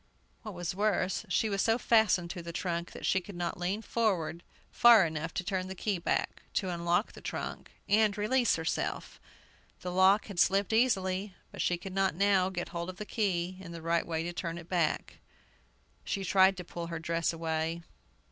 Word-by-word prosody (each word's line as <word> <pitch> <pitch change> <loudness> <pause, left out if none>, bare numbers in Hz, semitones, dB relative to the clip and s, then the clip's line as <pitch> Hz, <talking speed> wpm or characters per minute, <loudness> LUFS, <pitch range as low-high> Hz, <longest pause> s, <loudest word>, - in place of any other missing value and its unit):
What 215 -4 -8
was 175 -1 -3
worse, 195 -2 0
she 225 - +2
was 200 -2 0
so 225 0 +3
fastened 210 -8 +3
to 180 - -6
the 170 0 -7
trunk 170 0 -3
that - - -7
she 190 - +2
could 200 +1 -10
not 175 0 -3
lean 190 +5 -2
forward 185 -9 0 0.3
far 235 -5 +7
enough 160 0 -3
to 190 - -1
turn 185 -1 -2
the 190 - -6
key 195 -1 -1
back, - - -1
to 190 - 0
unlock 170 +4 0
the - - -13
trunk - - -5 0.2
and 210 0 +3
release 240 +4 +2
herself! 160 0 -3 0.6
The 180 - -4
lock 190 +3 +4
had 200 -4 -6
slipped 195 +4 +3
easily, 195 -5 +1 0.2
but - - -5
she 175 - +1
could 185 +2 -8
not 195 -4 +1
now 195 -1 +3
get 175 -2 -4
hold 170 +1 -4
of 185 - -8
the 210 - -5
key 185 -5 -1
in 175 -3 -9
the 165 - -7
right 165 0 +1
way 165 -1 -1
to 175 +1 -4
turn 170 -1 -4
it 170 -1 -10
back. 170 -4 -1 0.8
She 195 - -2
tried 190 0 +4
to 180 - -5
pull 170 0 -6
her 170 0 -4
dress 165 +1 -1
away. 165 0 -2
185 Hz, 195 wpm, -30 LUFS, 170-200 Hz, 0.8 s, far